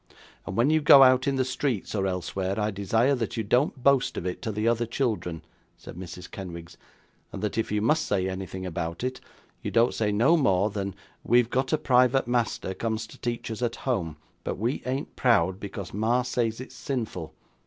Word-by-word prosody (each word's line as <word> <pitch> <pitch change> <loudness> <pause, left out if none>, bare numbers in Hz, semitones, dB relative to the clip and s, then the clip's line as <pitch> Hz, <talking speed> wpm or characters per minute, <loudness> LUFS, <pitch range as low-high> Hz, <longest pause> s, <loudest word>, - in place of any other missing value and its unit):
'And - - -4
when 125 +6 +4
you 155 0 +3
go 140 -2 +9
out 130 +1 +5
in 140 - +2
the 130 -1 +1
streets, 130 -4 -2
or 95 -2 0
elsewhere, 95 +2 -2
I 105 0 0
desire 110 +7 +2
that 120 -3 -2
you 110 - 0
don't 125 +4 +1
boast 140 -2 +3
of - - -4
it 90 - -3
to 110 - -3
the 105 +2 -1
other 115 0 +1
children,' 110 - -2 0.3
said - - -11
Mrs. 90 0 -9
Kenwigs; 85 -4 -8 0.6
'and 100 - -7
that 105 - -1
if 115 -1 -1
you 105 0 0
must 155 +7 +2
say 95 -2 0
anything 95 0 -5
about 85 +1 -4
it, 130 0 -3 0.4
you - - -3
don't 115 +1 +3
say 105 -2 0
no 120 +11 +4
more 100 - +2
than 100 -2 -4 0.3
"We've 120 -1 +3
got 130 +1 0
a 155 - +3
private 125 -1 +3
master 120 -5 -1
comes 110 +2 -2
to - - -15
teach 120 -1 -3
us 110 - -5
at 120 -1 0
home, 85 - -1 0.3
but - - -3
we 115 +6 -1
ain't 135 +3 -3
proud, 95 -7 +2
because 100 -2 -7
ma 115 +5 +1
says 120 -2 -1
it's 130 - -9
sinful." 110 - -4
115 Hz, 205 wpm, -26 LUFS, 95-125 Hz, 0.6 s, go